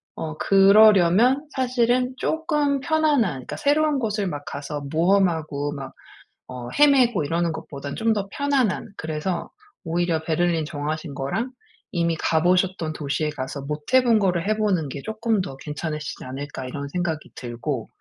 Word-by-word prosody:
어 155 Hz, -1 st, -5 dB
그러려면 210 Hz, -, +5 dB
사실은 250 Hz, -1 st, +1 dB
조금 300 Hz, -3 st, 0 dB
편안한 315 Hz, -1 st, +2 dB
그러니까 130 Hz, -2 st, -7 dB
새로운 295 Hz, 0 st, +2 dB
곳을 210 Hz, -3 st, -1 dB
막 145 Hz, -4 st, -5 dB
가서 145 Hz, +1 st, -5 dB
모험하고 160 Hz, -5 st, +1 dB
막 135 Hz, -2 st, -7 dB, 0.6 s
어 125 Hz, -1 st, -7 dB
헤매고 255 Hz, -, +4 dB
이러는 170 Hz, +3 st, 0 dB
것보단 145 Hz, -3 st, -7 dB
좀 225 Hz, 0 st, +1 dB
더 205 Hz, -2 st, -2 dB
편안한. 275 Hz, -10 st, 0 dB
그래서 160 Hz, +3 st, -3 dB, 0.3 s
오히려 165 Hz, -1 st, 0 dB
베를린 165 Hz, 0 st, +1 dB
정하신 155 Hz, 0 st, -4 dB
거랑 145 Hz, -, -3 dB, 0.4 s
이미 170 Hz, -2 st, 0 dB
가 160 Hz, 0 st, +1 dB
보셨던 180 Hz, -2 st, +1 dB
도시에 150 Hz, +1 st, -2 dB
가서 140 Hz, -1 st, -5 dB
못 150 Hz, -, -6 dB
해 260 Hz, -, +7 dB
본 235 Hz, -3 st, +4 dB
거를 185 Hz, -2 st, +1 dB
해 215 Hz, -, +1 dB
보는 185 Hz, -9 st, 0 dB
게 140 Hz, +1 st, -7 dB
'조금 220 Hz, -1 st, 0 dB
더 135 Hz, -7 st, -6 dB
괜찮으시지 150 Hz, +1 st, -5 dB
않을까?' 135 Hz, +1 st, -6 dB
이런 140 Hz, +2 st, -5 dB
생각이 160 Hz, -1 st, -3 dB
들고. 120 Hz, +1 st, -4 dB
170 Hz, 325 characters per minute, -23 LUFS, 150-220 Hz, 0.6 s, 해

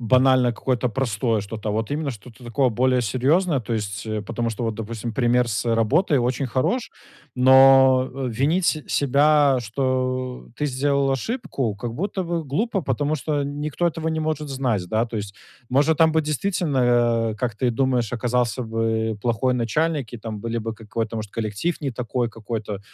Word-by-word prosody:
банально 130 Hz, +1 st, +4 dB
какое-то 125 Hz, +1 st, -1 dB
простое 115 Hz, -2 st, 0 dB
что-то, 110 Hz, +1 st, -6 dB
а -, -, 0 dB
вот 110 Hz, +3 st, -2 dB
именно 150 Hz, -1 st, -1 dB
что-то 120 Hz, +2 st, -12 dB
такое 125 Hz, +3 st, +1 dB
более 125 Hz, +2 st, +2 dB
серьезное, 135 Hz, -, +1 dB
то 115 Hz, +1 st, -5 dB
есть, 105 Hz, -1 st, -4 dB
э, 110 Hz, -1 st, -3 dB
потому 115 Hz, +3 st, -3 dB
что 115 Hz, +1 st, -4 dB
вот, 115 Hz, -1 st, -1 dB
допустим, 115 Hz, +1 st, -5 dB
пример 120 Hz, -1 st, +2 dB
с 110 Hz, +2 st, -1 dB
работой 130 Hz, -, +2 dB
очень 125 Hz, +2 st, 0 dB
хорош, 135 Hz, -, -1 dB, 0.5 s
но 130 Hz, 0 st, +6 dB, 0.2 s
винить 150 Hz, +10 st, +1 dB
се 155 Hz, -2 st, 0 dB
себя, 145 Hz, 0 st, +3 dB
что 130 Hz, +1 st, -2 dB
ты 150 Hz, -, -1 dB
сделал 140 Hz, +1 st, +1 dB
ошибку, 135 Hz, -, -3 dB
как 115 Hz, +3 st, -5 dB
будто 190 Hz, -, -2 dB
бы 170 Hz, -1 st, -2 dB
глупо, 195 Hz, -, -1 dB
потому 145 Hz, +3 st, -1 dB
что 145 Hz, 0 st, -1 dB
никто 145 Hz, +4 st, -2 dB
этого 165 Hz, -1 st, -2 dB
не 160 Hz, 0 st, -1 dB
может 155 Hz, -1 st, -2 dB
знать, 125 Hz, -8 st, -1 dB
да. 110 Hz, +4 st, +1 dB
То 115 Hz, -, -6 dB
есть, 100 Hz, -1 st, -5 dB, 0.4 s
может, 145 Hz, +4 st, +3 dB
там 160 Hz, -1 st, +5 dB
бы 160 Hz, 0 st, +2 dB
действительно, 155 Hz, -2 st, -1 dB, 0.5 s
а, -, -, -4 dB
как 120 Hz, -3 st, -2 dB
ты 125 Hz, -, +1 dB
и -, -, +2 dB
думаешь, 125 Hz, -2 st, 0 dB
оказался 125 Hz, -1 st, 0 dB
бы 110 Hz, -1 st, -1 dB
плохой 125 Hz, +2 st, +1 dB
начальник, 140 Hz, +2 st, -1 dB
и -, -, -5 dB
там 110 Hz, -2 st, -6 dB
были 115 Hz, +1 st, -3 dB
бы 110 Hz, 0 st, -4 dB
какой-то, 110 Hz, +1 st, -4 dB
может, 105 Hz, -2 st, -5 dB
коллектив 115 Hz, +11 st, -3 dB
не 135 Hz, -3 st, -3 dB
такой 120 Hz, 0 st, -2 dB
какой-то 110 Hz, -2 st, -5 dB
125 Hz, 180 wpm, -23 LUFS, 115-145 Hz, 0.5 s, но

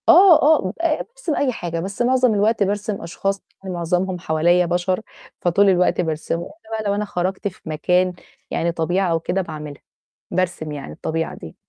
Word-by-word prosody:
آه، 350 Hz, -1 st, +8 dB
آه، 290 Hz, -11 st, +4 dB, 0.3 s
بارسم 480 Hz, -10 st, -4 dB
أي 275 Hz, -3 st, +1 dB
حاجة، 170 Hz, -7 st, -4 dB
بس 195 Hz, +6 st, -4 dB
معظم 250 Hz, -1 st, +3 dB
الوقت 210 Hz, +1 st, +2 dB
بارسم 205 Hz, +1 st, -2 dB
أشخاص 195 Hz, +4 st, -2 dB, 0.2 s
معظمهم 180 Hz, 0 st, -1 dB
حواليّا 175 Hz, +2 st, +3 dB
بشر، 180 Hz, +3 st, 0 dB, 0.4 s
فطول 195 Hz, +3 st, +4 dB
الوقت 180 Hz, -1 st, +3 dB
بارسمه 160 Hz, 0 st, -2 dB
إلّا 305 Hz, -8 st, -16 dB
بقى -, -, -3 dB
لو 200 Hz, -, +1 dB
أنا 210 Hz, +1 st, -1 dB
خرجت 190 Hz, 0 st, -2 dB
في 195 Hz, -, -8 dB
مكان 180 Hz, +4 st, +2 dB, 0.4 s
يعني 170 Hz, +1 st, 0 dB
طبيعة 175 Hz, +3 st, 0 dB
أو 165 Hz, -, +2 dB
كده 180 Hz, +4 st, -1 dB
باعملها، 150 Hz, -4 st, -7 dB, 0.5 s
بارسم 175 Hz, -4 st, -1 dB
يعني 145 Hz, -2 st, -6 dB
الطبيعة 165 Hz, +1 st, -3 dB
دي. 80 Hz, -, -10 dB
185 Hz, 165 wpm, -21 LUFS, 170-205 Hz, 0.5 s, آه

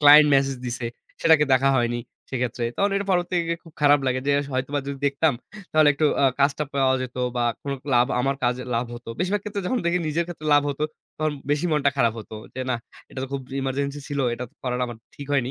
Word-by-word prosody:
client 150 Hz, 0 st, +9 dB
message 135 Hz, -1 st, +2 dB
দিছে। 120 Hz, 0 st, -3 dB, 0.3 s
সেটাকে 160 Hz, -2 st, +5 dB
দেখা 135 Hz, +1 st, +4 dB
হয়নি 120 Hz, 0 st, +1 dB, 0.3 s
সেক্ষেত্রে 125 Hz, -2 st, -2 dB, 0.3 s
এটা 200 Hz, -, -1 dB
পরবর্তী 175 Hz, 0 st, +1 dB
গিয়ে 170 Hz, 0 st, -1 dB
খুব 165 Hz, -, -14 dB
খারাপ 145 Hz, 0 st, +6 dB
লাগে 130 Hz, 0 st, +1 dB
যে 145 Hz, -, +3 dB, 0.2 s
হয়তোবা 135 Hz, +3 st, -1 dB
যদি 140 Hz, -1 st, -4 dB
দেখতাম 140 Hz, 0 st, +2 dB, 0.4 s
তাহলে 155 Hz, -1 st, +6 dB
একটু 155 Hz, +2 st, +2 dB, 0.2 s
আ -, -, +5 dB, 0.2 s
কাজটা 140 Hz, +2 st, +2 dB
পাওয়া 135 Hz, -1 st, +3 dB
যেত 130 Hz, 0 st, -7 dB, 0.2 s
বা, 120 Hz, -, +1 dB, 0.2 s
কোন 140 Hz, -, -3 dB
ক্লাব 125 Hz, -3 st, +3 dB
আমার 135 Hz, +2 st, +1 dB
কাজে 125 Hz, +1 st, +1 dB
লাভ 120 Hz, +2 st, 0 dB
হতো। 120 Hz, 0 st, -10 dB
বেশিরভাগ 190 Hz, +3 st, 0 dB
ক্ষেত্রে 205 Hz, -1 st, -4 dB
যখন 255 Hz, -, +1 dB
দেখি 175 Hz, +1 st, +2 dB
নিজের 165 Hz, +3 st, 0 dB
ক্ষেত্রে 160 Hz, -3 st, -7 dB
লাভ 145 Hz, -, +5 dB
হতো 140 Hz, +2 st, -4 dB, 0.3 s
তখন 155 Hz, -1 st, 0 dB, 0.2 s
বেশী 150 Hz, +4 st, +1 dB
মনটা 145 Hz, -2 st, +3 dB
খারাপ 115 Hz, -4 st, +3 dB
হতো। 110 Hz, 0 st, -9 dB, 0.2 s
যে 130 Hz, -, -4 dB
না -, -, +2 dB, 0.4 s
এটা -, -, -8 dB
তো -, -, -6 dB
খুব 135 Hz, -1 st, -2 dB, 0.2 s
emergency 140 Hz, +2 st, -2 dB
ছিল। 145 Hz, -1 st, -3 dB, 0.2 s
এটাতো 125 Hz, 0 st, -7 dB
করাটা 125 Hz, -1 st, -1 dB
আমার 120 Hz, -2 st, -8 dB, 0.2 s
ঠিক 140 Hz, -, -8 dB
হয়নি। 130 Hz, -3 st, +1 dB
140 Hz, 215 wpm, -24 LUFS, 125-150 Hz, 0.4 s, client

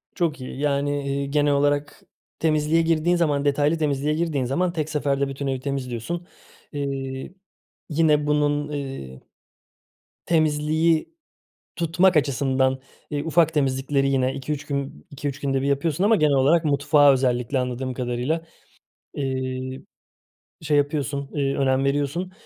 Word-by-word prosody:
Çok 160 Hz, -6 st, -1 dB
iyi. 130 Hz, +1 st, -7 dB
Yani, 145 Hz, 0 st, 0 dB
iii, 140 Hz, 0 st, -2 dB
genel 145 Hz, -1 st, +3 dB
olarak 145 Hz, +1 st, 0 dB, 0.4 s
temizliğe 155 Hz, +1 st, +2 dB
girdiğin 165 Hz, +1 st, +2 dB
zaman, 145 Hz, -4 st, +1 dB
detaylı 145 Hz, +3 st, +2 dB
temizliğe 150 Hz, -1 st, 0 dB
girdiğin 155 Hz, -5 st, -1 dB
zaman 175 Hz, +7 st, 0 dB
tek 155 Hz, -2 st, -2 dB
seferde 140 Hz, -2 st, 0 dB
bütün 135 Hz, 0 st, -4 dB
evi 130 Hz, -1 st, -1 dB
temizliyorsun, 135 Hz, +5 st, -4 dB, 0.4 s
iii, 135 Hz, +2 st, -4 dB, 0.5 s
yine 150 Hz, -1 st, +2 dB
bunun, 145 Hz, 0 st, +1 dB
ııı, 135 Hz, -, -6 dB, 1.1 s
temizliği 155 Hz, -, +1 dB, 0.6 s
tutmak 170 Hz, +1 st, +3 dB
açısından, 130 Hz, -2 st, +1 dB, 0.3 s
ııı, 145 Hz, +1 st, -2 dB
ufak 160 Hz, 0 st, +3 dB
temizlikleri 135 Hz, 0 st, +1 dB
yine 130 Hz, -1 st, +1 dB
2-3 145 Hz, +1 st, -4 dB
gün 140 Hz, -, -4 dB
2-3 145 Hz, 0 st, -5 dB
günde 135 Hz, -1 st, 0 dB
bir -, -, -1 dB
yapıyorsun 145 Hz, +5 st, 0 dB
ama 220 Hz, +1 st, +5 dB
genel 150 Hz, -2 st, +3 dB
olarak 155 Hz, +5 st, +3 dB
mutfağı 145 Hz, 0 st, +4 dB
özellikle 125 Hz, 0 st, 0 dB
anladığım 125 Hz, 0 st, -3 dB
kadarıyla, 125 Hz, +6 st, -2 dB, 0.7 s
ııı, 130 Hz, -1 st, -3 dB, 0.8 s
şey 150 Hz, -1 st, +1 dB
yapıyorsun, 140 Hz, -1 st, -1 dB
ııı, 140 Hz, -1 st, 0 dB
önem 135 Hz, 0 st, +2 dB
veriyorsun. 145 Hz, +6 st, -1 dB
145 Hz, 130 wpm, -23 LUFS, 135-155 Hz, 1.1 s, ama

